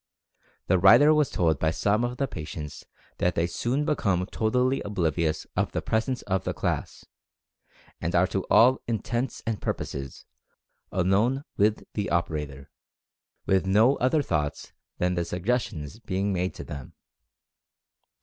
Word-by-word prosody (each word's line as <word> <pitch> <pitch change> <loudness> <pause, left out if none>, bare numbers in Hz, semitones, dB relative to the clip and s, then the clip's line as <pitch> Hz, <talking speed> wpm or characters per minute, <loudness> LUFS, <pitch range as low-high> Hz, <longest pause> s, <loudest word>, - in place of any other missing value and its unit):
The 95 0 +3
writer 145 - +7
was 150 -2 +2
told 80 -5 +1
by 80 - +2
some 105 +7 +1
of 120 +1 -2
the 140 - 0
patients 75 - -7 0.3
that 90 - +1
they 85 - +2
soon 125 +11 -1
be 155 - +2
come 90 -9 0
totally 125 +6 0
oblivious 85 -5 -1
of - - 0
the - - -1
presence 120 +3 -1
of 95 -2 -1
the - - -3
class, - - -3 1.0
and 85 +3 -1
are 85 +1 +5
to 95 0 -2
all 125 +3 +5
intents 120 +2 -2
and 115 -2 -2
purposes, 70 -2 -5 0.7
alone 100 +9 +2
with 105 +1 +2
the 105 -1 -2
operator, 75 -5 -2 0.7
with 95 0 +2
no 110 +8 +5
other 135 +4 +2
thoughts 75 - -2 0.2
than 90 0 +1
the 85 -1 0
suggestions 90 - -2
being 100 -2 -1
made 90 0 -1
to - - -7
them." 70 -3 -8
95 Hz, 145 wpm, -26 LUFS, 85-120 Hz, 1.0 s, writer